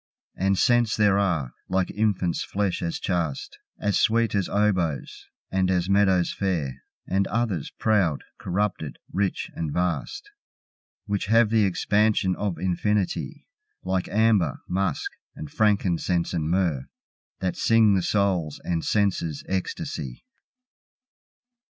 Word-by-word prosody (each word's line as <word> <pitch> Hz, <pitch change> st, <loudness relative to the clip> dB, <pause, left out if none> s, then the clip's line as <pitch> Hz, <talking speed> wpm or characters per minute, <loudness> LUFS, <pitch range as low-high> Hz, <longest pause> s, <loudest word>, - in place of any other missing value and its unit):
And 95 Hz, 0 st, +1 dB
scents 120 Hz, +2 st, +3 dB
there 100 Hz, -2 st, +4 dB
are, 80 Hz, -11 st, 0 dB, 0.2 s
like 95 Hz, 0 st, 0 dB
infant's 100 Hz, -5 st, 0 dB
flesh 100 Hz, -2 st, -1 dB
as 85 Hz, -1 st, -2 dB
chaste, 85 Hz, -7 st, -3 dB, 0.2 s
As 105 Hz, -1 st, +1 dB
sweet 115 Hz, -1 st, +2 dB
as 100 Hz, -3 st, 0 dB
oboes, 95 Hz, -8 st, 0 dB, 0.2 s
and 95 Hz, -1 st, +1 dB
as 90 Hz, 0 st, +1 dB
meadows 95 Hz, -3 st, +3 dB
fair, 75 Hz, -10 st, -2 dB, 0.3 s
And 95 Hz, +1 st, +1 dB
others, 110 Hz, -9 st, -1 dB
proud, 100 Hz, -9 st, +1 dB, 0.2 s
corrupted, 90 Hz, -5 st, -2 dB, 0.2 s
rich 95 Hz, 0 st, -1 dB
and 80 Hz, -3 st, -3 dB
vast, 85 Hz, -5 st, -2 dB, 0.7 s
Which 100 Hz, -2 st, -2 dB
have 115 Hz, 0 st, +4 dB
the 110 Hz, -2 st, +4 dB
expansion 105 Hz, 0 st, +2 dB
of 100 Hz, -3 st, -2 dB
infinity, 95 Hz, +2 st, -1 dB, 0.4 s
Like 95 Hz, -1 st, -1 dB
amber, 105 Hz, -, +2 dB
musk 95 Hz, +2 st, -1 dB, 0.2 s
and 75 Hz, -, -8 dB
frankincense 90 Hz, -5 st, +1 dB
and 80 Hz, -3 st, -1 dB
myrrh, 85 Hz, -8 st, 0 dB, 0.5 s
That 95 Hz, -1 st, -1 dB
sing 115 Hz, -2 st, +4 dB
the 95 Hz, -, +2 dB
soul's 90 Hz, -6 st, 0 dB
and 85 Hz, -2 st, -1 dB
senses' 95 Hz, -7 st, 0 dB
ecstasy. 80 Hz, -8 st, -4 dB
95 Hz, 120 wpm, -25 LUFS, 85-105 Hz, 0.7 s, there